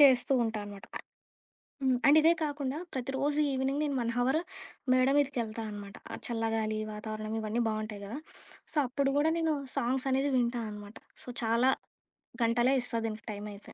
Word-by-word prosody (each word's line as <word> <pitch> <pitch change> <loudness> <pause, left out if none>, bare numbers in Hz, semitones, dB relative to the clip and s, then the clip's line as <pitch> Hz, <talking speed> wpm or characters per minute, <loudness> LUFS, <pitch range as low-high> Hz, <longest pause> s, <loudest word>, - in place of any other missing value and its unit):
చేస్తూ 265 -2 +7
ఉంటానమాట. 205 -3 -4
అ - - 0 0.9
హ్మ్. 260 -1 +3
అండ్ 290 +2 +8
ఇదే 325 +2 +6
కాకుండా, 290 -2 -2 0.2
ప్రతిరోజు 270 +3 0
ఈవినింగ్ 270 +2 0
నేను 290 -2 0
1 235 0 0
హవర్ 260 +5 +3 0.5
మేడ 255 0 +4
మీదకెళ్తా 235 -6 0
అనమాట, 205 0 -8 0.3
చల్లగాలి, 225 -2 0
వాతావరణం 215 +1 -4
ఇవన్నీ 220 +2 0
బావుంటాయి 215 -1 -4
గదా! 230 +8 -5 0.5
సో, - - -4
అప్పుడు 275 +2 +1
గూడా 305 +2 +4
నేను 320 -2 +2 0.2
సాంగ్సనేది 265 +3 +1
వింటా 240 -1 +1
అనమాట. 205 +1 -9 0.3
సో, - - -15 0.2
చాలా 230 +3 +4 0.7
గంటలే 240 +3 +3
ఇస్తా 235 - -2
దీనికి 215 -1 -6
టైమయితే. 205 0 -8
240 Hz, 145 wpm, -31 LUFS, 215-270 Hz, 0.9 s, అండ్